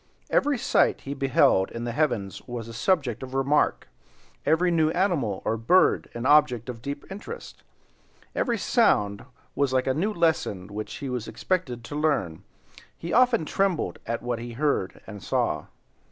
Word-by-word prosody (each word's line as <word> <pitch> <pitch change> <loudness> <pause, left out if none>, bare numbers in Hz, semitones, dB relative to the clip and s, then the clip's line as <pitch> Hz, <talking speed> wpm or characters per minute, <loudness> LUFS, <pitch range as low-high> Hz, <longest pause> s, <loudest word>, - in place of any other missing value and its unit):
Every 290 -2 +2
sight - - +2
he 140 - -5
beheld 135 -8 +3
in 115 - -6
the 120 - -2
heavens 120 -8 -1
was 120 -2 -5
a 115 - -8
subject 130 - 0
of 130 0 -7
remark, 135 +2 +1 0.6
every 175 +3 +3
new 160 -2 +3
animal 160 - 0
or 115 - 0
bird 180 +12 +3
an 120 +1 -4
object 135 -5 +4
of 115 -2 -6
deep 140 +3 -5
interest, 455 - -8 0.6
and - - -28
every 235 -2 0
sound 105 - +2 0.3
was 140 -2 0
like 130 -1 +2
a 130 - +1
new 190 +10 0
lesson 155 - 0
which 105 +1 -5
he 140 - -6
was 125 -3 -3
expected 140 -11 -2
to 145 - -7
learn. 145 - 0 0.6
He 170 - -5
often 245 -6 +4
trembled 185 - 0
at 115 +1 -3
what 120 -1 -2
he 120 0 -7
heard 135 -7 -1
and 105 -3 -9
saw. - - -1
135 Hz, 170 wpm, -26 LUFS, 115-165 Hz, 0.6 s, object